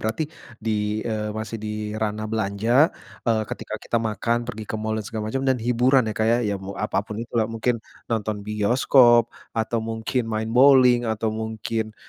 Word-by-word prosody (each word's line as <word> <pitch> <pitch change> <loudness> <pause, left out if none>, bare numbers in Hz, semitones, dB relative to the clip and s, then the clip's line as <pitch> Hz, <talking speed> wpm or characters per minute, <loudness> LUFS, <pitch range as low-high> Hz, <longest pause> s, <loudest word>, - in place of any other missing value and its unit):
berarti 110 +8 -1 0.3
di, 110 0 -2 0.3
eee, 105 -1 -2
masih 110 +1 -5
di 105 0 -4
ranah 110 0 -2
belanja, 110 +6 +2 0.3
eee, 115 -2 +1
ketika - - -6
kita 115 - -1
makan, 115 +2 0
pergi 110 -2 -6
ke - - -5
mall, 110 0 -2
dan 105 - -5
segala 110 -1 -4
macam, 135 +2 -2
dan 130 -1 +2
hiburan 125 +2 +3
ya - - -5
Kak 110 - +2
ya, 115 +1 +4
ya 105 -3 0
mau 95 +1 -7
apa - - -1
pun 110 - -6
itu 120 - -11
lah, 110 - +2
mungkin 115 +1 -1 0.3
nonton 110 -2 -1
bioskop 120 +3 +4 0.2
atau 115 +1 0
mungkin 115 +3 -2
main 110 0 -2
bowling 125 -1 +6
atau 110 0 -1
mungkin, 110 0 -3
110 Hz, 185 wpm, -24 LUFS, 110-120 Hz, 0.3 s, bowling